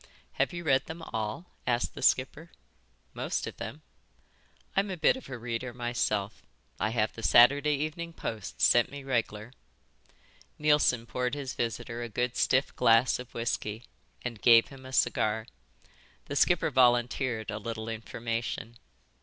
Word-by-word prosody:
"Have - - 0
you 175 -1 -6
read 135 -4 +2
them 165 +1 -7
all?" 110 +9 -3 0.2
asked 120 -1 0
the - - -9
skipper. 145 +5 +1 0.6
"Most - - -2
of - - -7
them." - - -7 0.9
"I'm 200 +1 +2
a 185 - -4
bit 160 - +4
of 260 - -10
a 130 - -5
reader 115 +1 -4
myself. 110 -4 -2 0.4
I 105 - +1
have 110 -1 0
the 115 - -9
Saturday 140 +6 +5
Evening 155 +4 -4
Post 110 - -6
sent 120 -1 +5
me 140 0 -8
regler." 115 -3 -2 1.0
Neilson 150 -6 +3
poured 125 +2 -2
his 135 -4 -5
visitor 115 0 -3
a 120 - -5
good 125 +3 -1
stiff 130 +1 +2
glass 115 +3 +4
of 125 - -10
whisky 115 -1 -2 0.4
and 120 -4 -5
gave 115 -1 +6
him 130 -1 -12
a - - -10
cigar. 110 -3 +1 0.8
The 145 - -5
skipper 165 +1 +3
volunteered 120 -2 +2
a 105 - -4
little 110 0 -5
information. 115 +1 -4
120 Hz, 150 wpm, -29 LUFS, 115-135 Hz, 1.0 s, gave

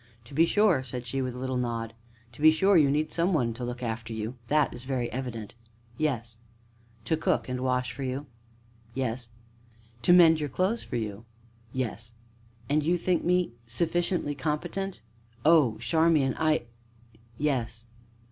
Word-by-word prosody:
"To 120 - -14
be 165 +4 +4
sure," 205 -9 +3
said 125 -1 -6
she, 135 +3 -2
with 130 -1 -3
a - - -7
little 130 0 -2
nod, 115 -2 -2 0.4
"to 120 - -14
be 155 - +9
sure, 190 +6 +4
you 150 -5 +6
need 150 +2 0
some 175 +3 +1
one 120 -7 +1
to - - -13
to 125 - -2
look 125 +1 -5
after 115 0 -4
you 110 +3 -4
that 150 +1 +2
is 120 - -7
very 130 -3 -2
evident!" 120 -5 -5 0.4
"Yes." 115 -5 -2 0.7
"To 160 - +2
cook 160 - 0
and 125 0 -3
wash 125 -1 0
for - - -8
you." 135 +2 -3 0.7
"Yes." 125 -2 -2 0.7
"To 125 - +3
mend 165 -3 +7
your 150 -1 -2
clothes 185 - 0
for - - -6
you." 110 -1 -4 0.5
"Yes." 115 -3 -4 0.5
"And 150 +1 +2
you 175 +4 +2
think 175 +1 0
me 180 -4 +2 0.2
sufficiently 170 +4 0
competent?" 150 - -3 0.4
"Oh, 150 -9 +5
Charmian, 145 +3 +2
I 155 -4 +2 0.7
yes." 120 -6 -1
130 Hz, 165 wpm, -28 LUFS, 120-160 Hz, 0.7 s, be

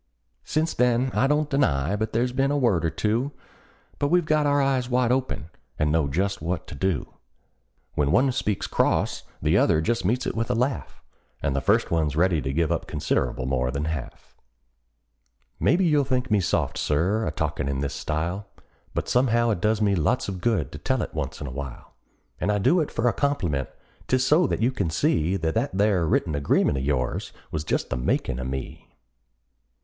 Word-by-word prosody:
Since 160 +2 0
then 125 +1 +2
I 135 - +3
don't 150 +1 +2
deny 90 - +1
but 110 +1 -2
there's 120 +3 +1
been 135 +2 +1
a 145 - +1
word 110 - +2
or 80 - +2
two; 115 - -1 0.7
But 145 - +2
we've 175 +2 +3
got 155 -1 +2
our 145 0 +3
eyes 135 -3 +1
wide 125 -1 +2
open, 125 -10 -1 0.3
and 75 0 +1
know 80 -2 +2
just 95 +7 -1
what 85 +2 -2
to - - -7
do: 95 -9 -2 0.8
When 70 -1 +1
one 130 - +4
speaks 105 -6 -1
cross - - +1 0.2
the - - +4
other 80 - +3
just 115 +7 0
meets 120 +7 0
it - - -1
with 115 +1 -1
a 125 - +1
laugh, 125 +4 -2 0.4
And 70 - 0
the 70 - 0
first - - +2
one's 80 -4 +1
ready 85 -1 +2
to 65 - -2
give 80 +2 0
up - - -1
considerable 65 - -1
more 65 -1 0
than 70 +3 -2
half. 80 -5 -6 1.2
Maybe 180 +5 +3
you'll 150 -3 +3
think 130 -2 -1
me 105 - +4
soft, 90 - 0
Sir, 90 +9 +1
a - - -1
talkin' 70 -2 -2
in 70 0 -2
this 70 -1 -2
style, 85 +6 -3 0.5
But - - -2
somehow 120 -2 +3
it 85 - -2
does 110 +1 +2
me 100 -1 +3
lots 100 +8 +1
of 95 -3 -5
good 110 -9 0
to - - -8
tell - - 0
it - - -7
once - - -4
in 75 - -5
a 70 - -5
while; 65 -2 -8 0.5
And 105 - +1
I 105 - +1
do 165 - +3
it 150 - -2
for 115 - 0
a 120 - +3
compliment 90 - -1 0.4
'tis 130 0 +2
so 155 +4 +4
that - - -1
you 125 - +3
can 100 -10 -1
see 80 +3 +1
That 80 -3 -1
that 115 -3 -1
there 100 -5 +2
written 80 0 +1
agreement 70 -1 +2
of - - -3
yours 65 -3 -1 0.2
was 75 - -2
just - - -2
the 60 - 0
makin' 60 0 -1
of 65 - -4
me. 65 0 -7
100 Hz, 205 wpm, -25 LUFS, 75-125 Hz, 1.2 s, one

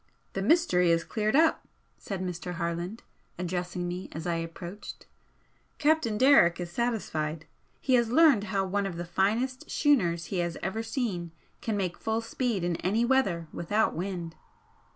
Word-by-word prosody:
"The 195 - -2
mystery 200 - +3
is 165 0 +3
cleared 215 +2 -1
up," 320 +2 +3 0.3
said 190 -2 -4
Mr. 180 0 -4
Harland, 170 +5 -3 0.3
addressing 180 0 -3
me 180 +1 -5
as 160 +2 -6
I 170 -1 0
approached 170 +4 -7 0.7
"Captain 295 -8 +2
Derrick 255 -10 +6
is 175 -1 -5
satisfied. 165 -9 -2 0.3
He 260 - 0
has 235 -2 +4
learned 265 -6 +5
how 195 -1 0
one 200 +1 -1
of 175 -3 -6
the 175 - -4
finest 220 +9 0
schooners 175 - +2
he 185 - 0
has 170 -1 -1
ever 190 +5 -2
seen 220 - -3 0.3
can 220 -2 -1
make 180 -3 -2
full 225 +1 -1
speed 230 -4 -2
in 175 -1 0
any 215 +6 +1
weather 200 -11 +1
without 205 +6 +1
wind." 175 -2 -4
190 Hz, 155 wpm, -28 LUFS, 175-230 Hz, 0.7 s, Derrick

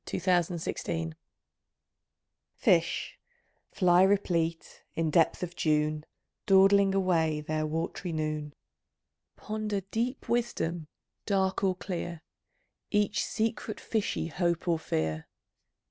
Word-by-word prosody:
MATAIEA, 180 -2 +1
1914 170 -1 -3
HEAVEN 160 - -12 1.4
Fish - - +1 0.5
(fly 180 -1 +4
replete, 175 -4 +1
in 165 -1 0
depth 165 +2 +3
of 175 0 -5
June, 150 0 0 0.4
Dawdling 195 0 +5
away 165 -5 +2
their 155 +1 -2
wat'ry 165 +3 -3
noon) 155 -2 -3 0.8
Ponder 215 -2 -3
deep 245 +4 -2
wisdom, 175 -9 -1 0.4
dark 190 -2 +1
or 190 -1 +2
clear, 175 -3 -5 0.7
Each 205 -1 +1
secret 220 -1 -2
fishy 220 -3 -1
hope 170 +1 -1
or 165 -2 +2
fear. 80 - -2
175 Hz, 100 wpm, -29 LUFS, 160-195 Hz, 1.4 s, Dawdling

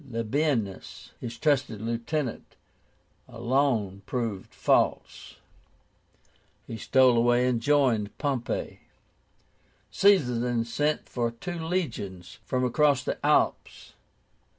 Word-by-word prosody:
LABIENUS, 115 -2 -2
his 120 -1 -7
trusted 135 -7 0
lieutenant, 115 +4 -3 0.7
alone 120 -7 0
proved 115 -7 -3
false. - - 0 1.3
He 115 - -7
stole 130 +3 +4
away, 120 +1 +3
and 120 -2 0
joined 125 -7 +1
Pompey. 135 -5 -3 1.1
Caesar 160 -13 +3
then 120 -1 0
sent 150 +6 -1
for 120 -2 -1
two 170 +10 -7
legions 110 - -4
from 130 0 0
across 140 +2 +2
the - - -4
Alps. - - 0
120 Hz, 95 wpm, -27 LUFS, 115-145 Hz, 1.3 s, stole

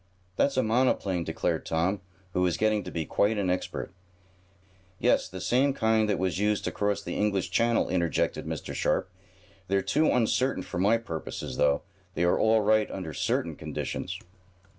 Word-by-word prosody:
"That's 140 +5 +1
a 130 - +4
monoplane," 110 -6 +1
declared - - -1
Tom, 90 +5 0 0.3
who 90 - +1
was 90 -2 +2
getting 110 -1 +2
to - - -6
be 80 -2 -2
quite 105 +7 +1
an 95 -3 +1
expert. 90 - -3 1.1
"Yes, - - +2
the 95 - -7
same 135 +7 +2
kind 110 -2 +2
that 105 - +1
was 95 0 -1
used 105 0 +1
to - - -2
cross 100 0 -1
the - - -4
English 100 -2 0
Channel," 115 0 +2
interjected 85 -4 0
Mr. - - -5
Sharp. 95 - 0 0.6
"They're 100 0 +1
too 155 +2 +2
uncertain 125 +2 +1
for 90 - -5
my 105 +5 +4
purposes, 85 -9 -6
though; 70 -1 +2 0.3
they 85 - +1
are 85 - +3
all 110 0 +4
right 110 +1 +3
under 85 -5 -5
certain - - -1
conditions." - - -4
105 Hz, 170 wpm, -28 LUFS, 90-110 Hz, 1.1 s, a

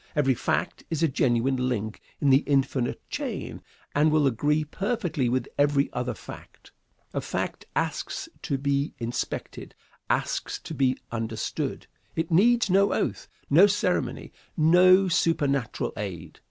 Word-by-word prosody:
Every 140 -3 +3
fact 125 +7 -2
is 165 -1 -1
a - - +5
genuine 130 -1 +1
link 110 -3 -3 0.2
in 140 - +3
the 135 - +7
infinite 135 -3 0
chain, - - -5 0.3
and 150 +2 +4
will 155 -1 +3
agree 145 +4 +2
perfectly 175 - -1
with 125 0 0
every 145 -1 +2
other 125 0 -2
fact. - - -12 0.4
A - - -1
fact - - -4
asks - - -2
to 140 - -1
be 140 +1 -1
inspected, 120 +1 -5 0.3
asks - - -1
to - - -7
be 130 -2 +1
understood. 110 -1 -3 0.3
It 160 +1 -2
needs 230 +7 +4
no 195 +1 +3
oath, - - -2 0.2
no 175 +8 +7
ceremony, 205 - -1 0.3
no 180 +4 +6
supernatural 150 -8 0
aid. 90 -6 -6
140 Hz, 135 wpm, -26 LUFS, 125-165 Hz, 0.4 s, the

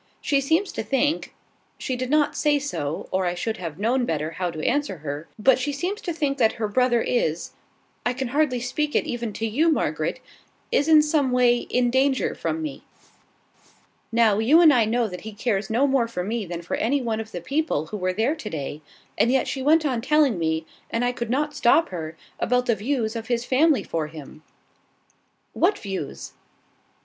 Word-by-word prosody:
She 280 -1 +1
seems 325 +8 +1
to - - -4
think, 275 +7 0 0.4
she 260 - -3
did 255 0 -3
not 295 0 +2
say 295 -1 +2
so, 165 - -4
or 185 -1 +1
I 175 - -1
should 220 +5 -3
have 165 -4 -6
known 245 +5 +1
better 155 -7 -2
how 180 +1 -2
to 155 -2 -5
answer 290 -10 0
her, 145 +2 -4
but 255 +4 +4
she 290 +3 -1
seems 360 +9 -3
to 350 - -3
think 290 -4 -1
that 225 -3 +4
her 220 -2 -2
brother 240 +2 +2
is 175 -9 -1 0.5
(I 245 - 0
can 260 -1 -3
hardly 275 -2 +1
speak 295 +5 -2
it - - +2
even 235 -2 -3
to 225 - -3
you, 295 +10 +2
Margaret!) 305 - -1 0.5
is 290 - +2
in 310 -1 +7
some 300 -4 +1
way 250 -1 +4
in 245 0 0
danger 265 +1 +2
from 320 0 -3
me. 300 -3 -5 1.3
Now, 225 -3 +3
you 265 +9 +5
and 320 -4 +7
I 235 -4 +4
know 230 +1 +1
that 180 -3 -8
he 220 0 -8
cares 205 -2 -1
no 240 +5 +2
more 265 -4 +2
for 205 -6 -4
me 215 0 -3
than 170 0 -5
for - - -3
any 275 +6 +1
one 230 -4 -2
of 220 0 -6
the - - -5
people 275 - -1
who 190 +6 -6
were 185 -1 0
there 220 +9 +1
to 305 -10 -7
day; 150 -2 -5 0.4
and 235 - +4
yet 265 -1 +2
she 270 - -3
went 310 +3 +4
on 250 -5 0
telling 280 - +3
me, 160 0 -1 0.2
and 230 +2 0
I 245 - +2
could 235 -2 -5
not 295 +4 0
stop 320 +7 +4
her, 160 -2 -6 0.2
about 250 +1 +1
the 235 - +3
views 225 +1 -2
of 225 -1 -5
his 240 -1 -1
family 290 +2 +3
for 160 -2 -3
him!" 155 -1 -11 1.1
"What 370 +5 +2
views?" 190 - -6
240 Hz, 205 wpm, -24 LUFS, 205-280 Hz, 1.3 s, in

